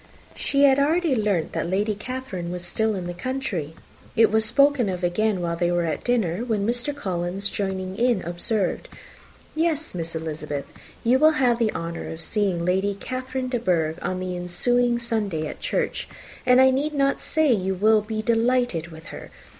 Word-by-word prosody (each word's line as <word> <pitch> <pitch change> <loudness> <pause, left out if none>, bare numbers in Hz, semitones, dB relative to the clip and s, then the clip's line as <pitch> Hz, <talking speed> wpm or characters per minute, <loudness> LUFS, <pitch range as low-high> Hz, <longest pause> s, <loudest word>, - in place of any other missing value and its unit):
She 280 0 +1
had 275 -1 +6
already 315 +1 +2
learnt 205 -7 0
that - - -2
Lady 205 +3 +1
Catherine 210 -5 -5
was 175 -1 -5
still 220 +4 0
in 185 -2 -4
the 175 - -4
country. 190 - -3 0.4
It 225 -2 +5
was 220 0 +3
spoken 275 -1 +3
of 180 -1 -4
again 190 +2 +1
while 170 -1 -1
they 175 +1 0
were 175 -1 +1
at 160 - -3
dinner, 220 -9 +1
when 220 -5 -1
Mr. 245 +5 0
Collins 185 -3 -2
joining 190 -2 -3
in, 235 -4 +2
observed, 180 +3 -2 0.6
"Yes, 320 -1 0
Miss 165 -2 -5
Elizabeth, 150 -3 -4 0.4
you 250 +3 +4
will 310 +2 +6
have 245 -3 +3
the 225 -2 +2
honour 165 0 -5
of 160 - -7
seeing 190 -3 0
Lady 190 +3 +1
Catherine 255 +4 -4
de 245 -2 -1
Bourgh 165 -6 0
on 185 0 -2
the 185 -1 -3
ensuing 240 +8 +1
Sunday 215 -9 -2
at - - -6
church, - - -2 0.4
and 250 0 +6
I 260 0 +7
need 295 +3 -1
not 275 -1 +2
say 310 -5 +3
you 190 -2 -1
will 215 +3 +4
be 215 +1 -4
delighted 230 -6 +1
with 160 -1 -12
her. - - -9
210 Hz, 180 wpm, -24 LUFS, 175-250 Hz, 0.6 s, I